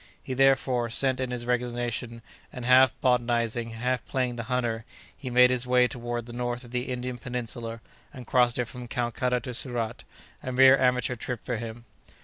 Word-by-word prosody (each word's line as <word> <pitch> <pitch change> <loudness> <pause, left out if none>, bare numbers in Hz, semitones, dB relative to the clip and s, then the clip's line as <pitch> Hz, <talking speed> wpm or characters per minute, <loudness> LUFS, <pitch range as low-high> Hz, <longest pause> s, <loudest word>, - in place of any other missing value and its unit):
He, 130 - -4
therefore, 130 -2 +2
sent 130 +2 +2
in 130 -1 -2
his 120 -1 -4
resignation, 120 -1 -2 0.3
and 125 -2 -7
half 130 0 +6
botanizing, 120 -2 +1
half 125 +3 -2
playing 125 -2 -1
the 115 -1 -5
hunter, 120 -3 -1 0.3
he 130 - -7
made 125 +1 +6
his 125 0 0
way 125 0 +4
toward 120 -1 -4
the 120 - -10
north 120 0 -3
of 120 - -13
the 125 +1 -2
Indian 125 0 -4
Peninsula, 115 -1 -5 0.3
and 130 -3 -10
crossed 125 0 +3
it 125 - 0
from 125 +1 -9
Calcutta 125 +1 -1
to 125 - -6
Surat—a 120 +1 -5
mere 130 +1 +8
amateur 125 -2 +1
trip 120 0 -5
for 125 -2 -2
him. 115 +1 -7
125 Hz, 175 wpm, -27 LUFS, 120-125 Hz, 0.3 s, mere